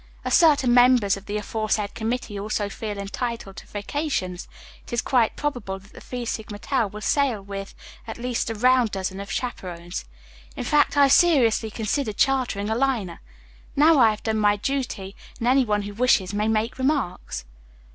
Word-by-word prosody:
"As - - -1
certain 285 -7 +5
members 245 -5 +5
of 195 0 -12
the 210 +1 -2
aforesaid 210 -1 -2
committee 225 -2 -3
also 205 0 -2
feel 210 0 -5
entitled 200 0 -4
to - - -10
vacations, 205 - -3 0.4
it - - -14
is 240 - 0
quite 240 -3 +2
probable 245 -10 -3
that 195 +2 -18
the - - -12
Phi 250 -1 -5
Sigma 220 -2 -5
Tau 250 0 0
will 210 +2 -9
sail 270 -3 +1
with 195 0 -7 0.3
at 225 - -6
least 240 -1 -2
a 225 - -3
round 250 +1 +4
dozen 190 -1 -4
of 200 0 -7
chaperons. 175 - -5 0.5
In - - -4
fact, 295 0 +2
I 285 - +7
have 275 - +4
seriously 255 -11 +4
considered 215 +1 -2
chartering 255 -7 +1
a - - +1
liner. 235 -9 -1 0.5
Now 305 +1 +5
I 230 -3 +7
have 215 -1 -4
done 220 -1 0
my 205 -1 +4
duty 210 -5 -3 0.2
and 235 - -2
any 260 +1 +4
one 210 -2 0
who 205 0 -6
wishes 215 -4 +2
may 210 +1 0
make 220 +3 0
remarks." 260 - -1
220 Hz, 180 wpm, -24 LUFS, 200-255 Hz, 0.5 s, I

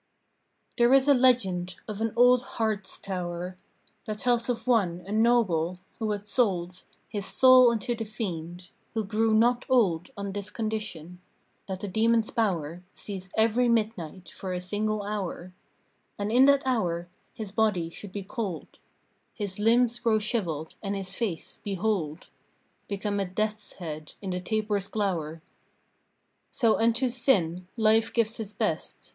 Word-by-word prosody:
There 240 +1 +5
is 270 +1 +4
a 285 - +7
legend 195 -9 +2
of 215 0 -5
an 225 0 0
old 245 +1 +6 0.2
Hartz 215 -4 -1
tower 180 -1 -4 0.5
That 215 -1 -3
tells 240 +1 +1
of 240 -2 -2
one, 195 -9 +2
a 200 - -8
noble, 210 -7 +2 0.2
who 220 -2 -1
had 205 -1 -3
sold 185 -6 0 0.2
His 205 -2 -4
soul 255 -1 +7
unto 235 +1 -1
the 225 -1 -4
Fiend; 180 -5 -5 0.3
who 220 - 0
grew 220 +2 +1
not 240 +3 +3
old 195 -9 +2
On 200 -1 -4
this 200 +1 -4
condition: 210 -7 -4 0.5
That 190 -1 -5
the 205 - -3
demon's 225 +3 +2
power 175 -7 -1
Cease 190 -2 -7
every 230 +2 +3
midnight 210 -6 -1
for 185 -1 -6
a 180 - -2
single 210 +3 -1
hour, 195 -3 -4 0.6
And 205 +1 -2
in 250 +3 +6
that 280 0 +5
hour 175 -9 0 0.3
his 215 -3 -6
body 205 -6 +1
should 200 +3 -9
be 200 0 -5
cold, 195 -5 -5 0.6
His 205 -3 -4
limbs 235 +2 +3
grow 225 -2 +2
shriveled, 185 -8 -2
and 200 -1 -2
his 195 -1 -4
face, 195 -9 -4
behold! 190 -5 -2 0.6
Become 205 0 -2
a 195 - 0
death's 215 +3 -3
head 155 -3 -7
in 195 -2 -5
the 180 - -2
taper's 210 0 -1
glower. 165 -7 -2 1.1
So 230 -4 +2
unto 230 +3 +3
Sin 185 -9 +1
Life 220 0 +3
gives 230 -1 +1
his 215 -2 -5
best. - - -3
210 Hz, 150 wpm, -27 LUFS, 180-230 Hz, 1.1 s, a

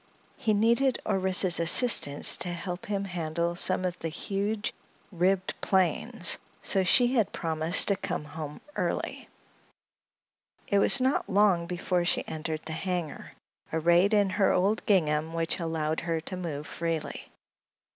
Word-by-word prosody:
He 220 -4 0
needed 235 +5 +2
Orissa's 190 -3 +1
assistance 170 - +4
to 175 - -2
help 175 +1 -6
him 200 -1 -2
handle 170 -1 -3
some 185 +1 0
of 180 -1 -3
the 165 - -3
huge 205 +5 -3 0.4
ribbed 185 +1 0
planes, 185 -5 +1
and - - -25
so 195 - +3
she 245 +7 +3
had 225 -7 +1
promised 160 +3 +2
to 200 - +3
come 150 - -4
home 150 0 -8
early. - - -3 1.4
It 200 - +2
was 260 +6 +6
not 260 +2 0
long 190 -4 +2
before 180 0 -1
she 175 - 0
entered 155 0 -5
the 160 - -5
hangar, 175 -2 -4 0.4
arrayed 170 +6 +3
in 200 -2 +2
her 195 0 +2
old 200 +4 +1
gingham, 160 -5 +1
which 165 +2 -1
allowed 160 -2 -2
her 165 -1 -2
to 165 +4 -7
move 160 -5 -5
freely. 165 -1 -4
180 Hz, 145 wpm, -27 LUFS, 160-200 Hz, 1.4 s, was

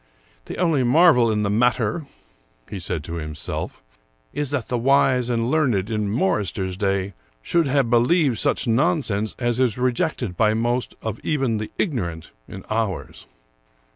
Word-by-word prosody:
" - - -35
The - - -6
only 165 -6 +2
marvel 125 -2 +5
in 105 -1 0
the 100 - 0
matter," 120 +5 +1 0.6
he 100 - -6
said 90 -3 -2
to 85 +2 -5
himself, 75 -1 -5 0.2
" - - -41
is 145 -2 -2
that 140 -5 -2
the 125 - -2
wise 130 -1 +3
and 115 +1 0
learned 120 -10 +1
in 105 -2 -1
Morryster's 95 -4 -1
day 100 0 -1 0.3
should 170 - +1
have 135 -3 +1
believed 125 +1 +3
such - - +1
nonsense 115 - +1
as 120 -1 0
is 125 -4 +1
rejected 125 - -1
by 110 +2 +2
most 120 +2 -1
of 110 -1 -4
even 135 -8 0
the 105 - -5
ignorant 90 - -3 0.2
in 95 - -10
ours." 110 -5 -3
115 Hz, 160 wpm, -22 LUFS, 100-135 Hz, 0.6 s, marvel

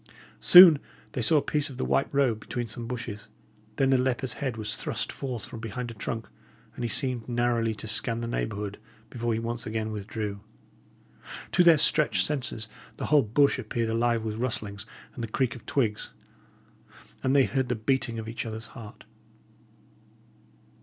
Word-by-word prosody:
Soon 175 -5 +10 0.3
they 125 - -3
saw 135 +7 +4
a 145 - +2
piece 150 -1 0
of 130 - -10
the - - -2
white 135 - +1
robe 135 -6 +2
between 120 +2 -4
some 115 +1 -6
bushes; 115 -3 -6 0.5
then 135 +2 +2
the 130 - +4
leper's 130 0 -1
head 130 -5 -2
was 105 -1 -2
thrust - - -3
forth 125 -6 -5
from 115 - -9
behind 115 +2 -5
a - - -8
trunk, 115 +1 -5 0.5
and 120 - -6
he 120 - -1
seemed 125 -4 -1
narrowly 120 -2 +1
to 105 +1 -7
scan 115 +2 +1
the 120 - -3
neighbourhood 105 -3 -3 0.3
before 120 -1 -2
he - - 0
once 115 0 -4
again 110 0 -2
withdrew. 105 -1 -4 1.1
To 180 - +4
their 170 -2 +7
stretched 155 +1 +3
senses, 125 -6 -3 0.3
the - - -3
whole 150 - +7
bush 135 +5 +2
appeared 115 -1 -2
alive 115 0 +1
with 110 -1 -3
rustlings 110 -4 -3 0.3
and 120 - -6
the - - -2
creak 120 +2 -1
of 120 - -13
twigs; 110 -7 -1 1.1
and 130 +1 +1
they 135 -2 +6
heard 130 -2 -1
the 125 - +1
beating 115 0 0
of 110 -1 -5
each 115 - -4
other's 110 0 -5
heart. 110 -3 -11
120 Hz, 175 wpm, -27 LUFS, 110-130 Hz, 1.1 s, Soon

